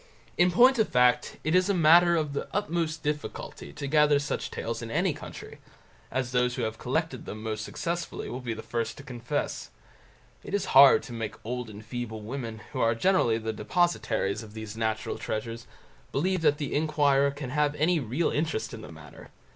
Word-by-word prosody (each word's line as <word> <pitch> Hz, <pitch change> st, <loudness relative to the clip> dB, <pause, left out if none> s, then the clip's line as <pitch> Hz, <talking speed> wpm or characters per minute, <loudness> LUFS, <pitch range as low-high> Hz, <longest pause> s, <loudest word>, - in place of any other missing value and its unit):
In 175 Hz, +1 st, +4 dB
point 245 Hz, +6 st, +5 dB
of 220 Hz, -, +3 dB
fact, 125 Hz, -1 st, +3 dB
it 155 Hz, -, 0 dB
is 185 Hz, +2 st, +4 dB
a 200 Hz, -, +2 dB
matter 170 Hz, +1 st, +6 dB
of 155 Hz, -3 st, -1 dB
the 140 Hz, -, -3 dB
utmost 165 Hz, -5 st, -1 dB
difficulty 150 Hz, 0 st, -4 dB
to 145 Hz, -1 st, -6 dB
gather 150 Hz, 0 st, +4 dB
such 145 Hz, +1 st, -3 dB
tales -, -, -4 dB
in -, -, -6 dB
any -, -, +1 dB
country, -, -, -10 dB, 0.5 s
as 130 Hz, -2 st, -2 dB
those 125 Hz, 0 st, +1 dB
who 125 Hz, -, -2 dB
have 110 Hz, 0 st, -3 dB
collected 135 Hz, 0 st, -2 dB
them 110 Hz, +1 st, -7 dB
most 110 Hz, -1 st, -3 dB
successfully 170 Hz, +7 st, -4 dB
will 125 Hz, -, -5 dB
be 120 Hz, -2 st, -3 dB
the 110 Hz, -, -8 dB
first 115 Hz, -2 st, -3 dB
to 145 Hz, -, -10 dB
confess. 120 Hz, -3 st, -4 dB, 0.7 s
It 200 Hz, -, -3 dB
is 205 Hz, -, 0 dB
hard 135 Hz, +1 st, +8 dB
to 120 Hz, -, -9 dB
make 115 Hz, -2 st, -4 dB
old 125 Hz, 0 st, -4 dB
and 105 Hz, +1 st, -11 dB
feeble 110 Hz, -1 st, -5 dB
women, 115 Hz, -2 st, -5 dB
who 115 Hz, 0 st, +2 dB
generally 150 Hz, -4 st, +3 dB
are 115 Hz, -, -3 dB
the 110 Hz, 0 st, -3 dB
depositaries 170 Hz, -, 0 dB
of 110 Hz, -1 st, -12 dB
these 110 Hz, -1 st, -7 dB
national 110 Hz, -1 st, -2 dB
treasures, 115 Hz, +2 st, -4 dB, 0.4 s
believe 185 Hz, +5 st, 0 dB
that 150 Hz, -2 st, +3 dB
the 145 Hz, -3 st, -4 dB
inquirer 145 Hz, -2 st, +3 dB
can 140 Hz, -2 st, -6 dB
have 150 Hz, +1 st, +1 dB
any 160 Hz, +3 st, +2 dB
real 135 Hz, +6 st, -1 dB
interest 155 Hz, -2 st, -2 dB
in 115 Hz, -, -7 dB
the 110 Hz, -, -10 dB
matter. 80 Hz, -3 st, -13 dB
135 Hz, 195 wpm, -28 LUFS, 115-160 Hz, 0.7 s, hard